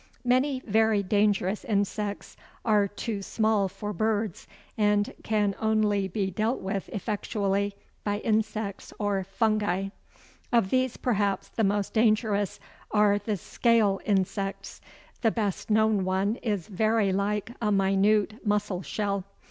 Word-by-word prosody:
Many 255 +2 +2
very 220 -1 +3
dangerous 205 0 +1
insects 205 -3 -2 0.3
are 210 -3 +4
too 205 +1 -4
small 215 0 +1
for 205 +2 -6
birds, 215 0 -1 0.3
and 210 -1 +2
can 210 -2 +1
only 215 -3 +2
be 190 +1 -2
dealt 220 +6 0
with 195 0 -3
effectually 200 -1 -1 0.3
by 205 -1 0
insects 215 -2 -1
or 205 -2 0
fungi. 195 -1 0 0.6
Of 230 -5 +2
these 255 -1 +1
perhaps 205 -5 0
the 225 - -1
most 200 0 0
dangerous 215 -3 +2 0.3
are 210 -1 +3
the 205 0 -2
"scale" 215 0 +2
insects. 195 0 -2 0.4
The 225 - +4
best 210 -3 -2
known 215 -2 +3
one 190 +4 0
is 205 -7 -2
very 215 0 +1
like 205 +3 -1
a 210 -2 +1
minute 200 +3 +2
mussel 205 -4 0
shell. 200 0 -2
205 Hz, 125 wpm, -27 LUFS, 195-220 Hz, 0.6 s, are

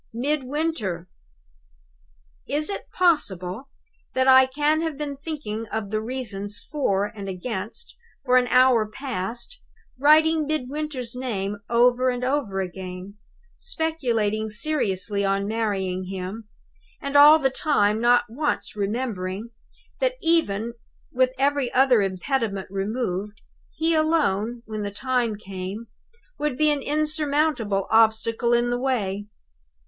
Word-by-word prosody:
Midwinter!!! 265 - -2 1.4
"Is 305 +6 0
it - - -6
possible 240 - +1 0.5
that 260 0 +2
I 260 0 +8
can 295 +4 +1
have 320 -4 -3
been 290 -1 -4
thinking 275 -7 -5
of 210 -2 -4
the 215 0 0
reasons 215 -4 -4
For 200 -10 -1
and 205 -1 -7
Against, 205 - -5 0.3
for 250 -1 +5
an 250 -1 +3
hour 250 -3 +4
past 245 - -5 0.4
writing 310 +2 +5
Midwinter's 285 -4 -3
name 205 -6 -3
over 245 +2 +4
and 250 0 -2
over 250 -8 0
again 185 +2 -7 0.4
speculating 230 -10 -1
seriously 205 -6 -1
on 195 0 +1
marrying 195 -4 -1
him 195 +4 -6 0.5
and 280 +1 -5
all 295 +2 +9
the 270 -4 +1
time 220 -8 +2
not 240 +1 +5
once 290 +3 -2
remembering 205 -1 -3 0.5
that, - - +1
even 235 -10 +1 0.4
with 255 0 +3
every 275 -2 +1
other 255 -4 +5
impediment 195 +1 -1
removed, 205 0 -3 0.4
he 325 +1 +1
alone, 245 -8 +1
when 215 -1 -5
the 205 - -2
time 240 +1 -1
came, 195 +2 -6 0.5
would 295 -4 -1
be 305 0 +4
an 290 -1 -1
insurmountable 295 - 0
obstacle 225 +1 +3
in 240 0 +2
my - - +1
way? 210 -6 -1
240 Hz, 120 wpm, -24 LUFS, 205-285 Hz, 1.4 s, all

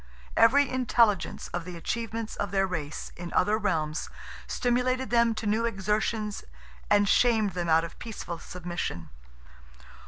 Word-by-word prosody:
Every 280 +5 +5
intelligence 235 -6 +1
of 175 -1 -3
the 180 0 -7
achievements 225 +4 -3
of 205 - -2
their 195 +1 +2
race 155 -5 -5
in 175 0 -7
other 210 +3 +3
realms 160 -7 -1 0.4
stimulated 255 +1 0
them 235 -1 +4
to 215 - -4
new 215 +2 +1
exertions 210 0 -1 0.5
and 205 0 +4
shamed 220 -2 +3
them 175 -1 -3
out 160 +1 +5
of 170 - -8
peaceful 200 -7 -6
submission. 175 - -5
210 Hz, 135 wpm, -28 LUFS, 175-230 Hz, 0.5 s, Every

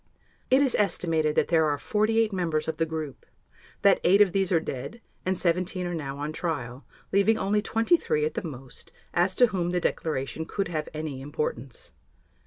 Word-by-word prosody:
It 265 +2 +5
is 265 - +2
estimated 165 -6 +1
that - - +2
there 160 -2 +4
are 145 -1 0
48 215 +5 +1
members 165 -5 -1
of 160 -1 -2
the 165 - 0
group, 155 -3 -5 0.6
that 200 - +5
eight 195 +3 +5
of 205 -3 +6
these 195 0 0
are 170 - +4
dead 140 - -6 0.3
and 185 0 +1
17 180 +1 0
are 175 - -3
now 140 -4 -4
on 150 +2 -4
trial, 140 -7 -4 0.2
leaving 200 +3 +3
only 210 +1 +1
23 225 - +1
at 155 - -2
the 230 - -3
most, 135 -7 -9 0.2
as 180 +2 +2
to 250 - +6
whom 175 -2 0
the 180 0 0
declaration 160 -2 -2
could 195 +2 -3
have 155 -3 -3
any 155 -4 -5
importance. 135 -4 -4
170 Hz, 185 wpm, -27 LUFS, 150-195 Hz, 0.6 s, of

